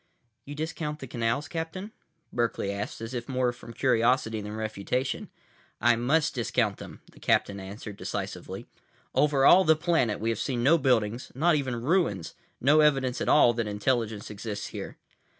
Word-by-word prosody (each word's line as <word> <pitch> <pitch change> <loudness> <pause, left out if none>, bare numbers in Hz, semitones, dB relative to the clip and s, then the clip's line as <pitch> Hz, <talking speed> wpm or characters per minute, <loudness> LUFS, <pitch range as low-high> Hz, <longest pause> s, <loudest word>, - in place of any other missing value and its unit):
"You 145 - -7
discount 155 -1 -4
the 135 - -8
canals, 120 +3 -1
Captain?" 170 +5 -5 0.4
Berkeley 115 -4 -1
asked, 100 +2 -5
as 115 +2 -6
if 120 0 -5
more 125 -2 +1
from 120 - -12
curiosity 115 -2 +2
than 105 +1 -6
refutation. 110 +4 -2 0.5
"I 120 +1 +4
must 140 +7 +1
discount 115 -3 0
them," - - -10
the - - -18
captain 100 0 +1
answered 100 +2 -8
decisively. - - -5 0.5
"Over 145 -2 +3
all 185 +5 +8
the 160 -2 +5
planet 155 - +1
we 115 - -1
have 115 - -3
seen 125 -4 -1
no 165 +6 +5
buildings, 120 -3 +1
not 165 +6 +3
even 130 -6 -1
ruins, 140 - +1 0.3
no 145 +5 +5
evidence 135 -4 +2
at - - 0
all 120 -5 +6
that 115 -1 -2
intelligence 105 0 -1
exists 105 0 -5
here." - - -7
120 Hz, 165 wpm, -27 LUFS, 110-145 Hz, 0.5 s, all